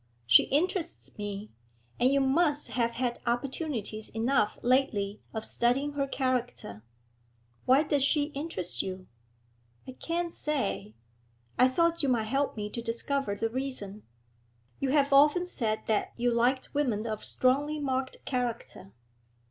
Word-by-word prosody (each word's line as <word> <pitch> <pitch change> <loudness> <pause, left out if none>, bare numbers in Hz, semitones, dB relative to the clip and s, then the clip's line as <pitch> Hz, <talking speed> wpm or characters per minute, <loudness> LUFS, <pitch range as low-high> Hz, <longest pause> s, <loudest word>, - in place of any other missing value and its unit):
She 115 0 +7
interests 340 +3 -1
me, 205 0 -5 0.5
and 250 +2 +4
you 275 0 +3
must 295 +2 +2
have 235 -1 0
had 240 -1 -1
opportunities 240 - -2
enough 225 -1 +1
lately 235 -6 +1
of 220 -1 -5
studying 265 +5 +1
her 280 -1 -1
character?' 250 - -2 0.8
'Why 265 +4 +5
does 290 -3 +1
she 290 +1 +2
interest 275 - -3
you?' 185 -1 -6 0.8
'I - - -5
can't 340 0 -2
say. 205 - -2 0.6
I 255 - +7
thought 335 +5 +2
you 280 - +1
might 235 -3 +2
help 270 +3 -1
me 210 -1 -3
to 235 - -4
discover 230 0 -1
the 225 +2 -1
reason. 230 -5 -5 0.8
You 275 - 0
have 280 0 +3
often 300 +6 +5
said 220 -11 -1
that 215 -2 0
you 245 0 +1
liked 245 +3 +1
women 245 -7 0
of 215 -2 -4
strongly 285 +4 +1
marked 265 -2 -3
character.' 240 - -4
255 Hz, 140 wpm, -29 LUFS, 220-285 Hz, 0.8 s, She